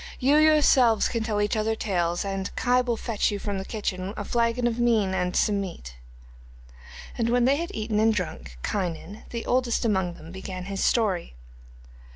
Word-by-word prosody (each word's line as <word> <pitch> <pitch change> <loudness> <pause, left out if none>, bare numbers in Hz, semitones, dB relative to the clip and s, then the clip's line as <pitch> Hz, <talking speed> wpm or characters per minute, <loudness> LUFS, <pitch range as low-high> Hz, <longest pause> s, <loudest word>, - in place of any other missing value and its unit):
You 280 +3 +4
yourselves 285 -7 +5
can 230 - -2
tell 220 -2 -1
each 205 +2 +1
other 220 +1 0
tales, 175 -4 -1
and 195 0 -3
Kai 250 0 +2
will 240 -2 -1
fetch 225 -3 0
you 205 - -2
from 200 -1 -3
the - - -4
kitchen 195 -2 -4
a 205 - -4
flagon 235 +2 0
of 240 0 0
mean 225 -5 +2
and 180 -1 -1
some 205 -2 +2
meat.' 60 - -7 1.3
And 230 0 +1
when 245 0 +3
they 275 +2 +3
had 340 +2 -3
eaten 215 -1 -1
and 220 +1 +4
drunk, 160 - -4
Kynon, 195 +2 -4
the 235 -1 -5
oldest 245 -2 +1
among 190 -5 0
them, 160 - -12
began 185 -1 -7
his 195 0 -3
story. 195 - +1
210 Hz, 185 wpm, -26 LUFS, 190-235 Hz, 1.3 s, yourselves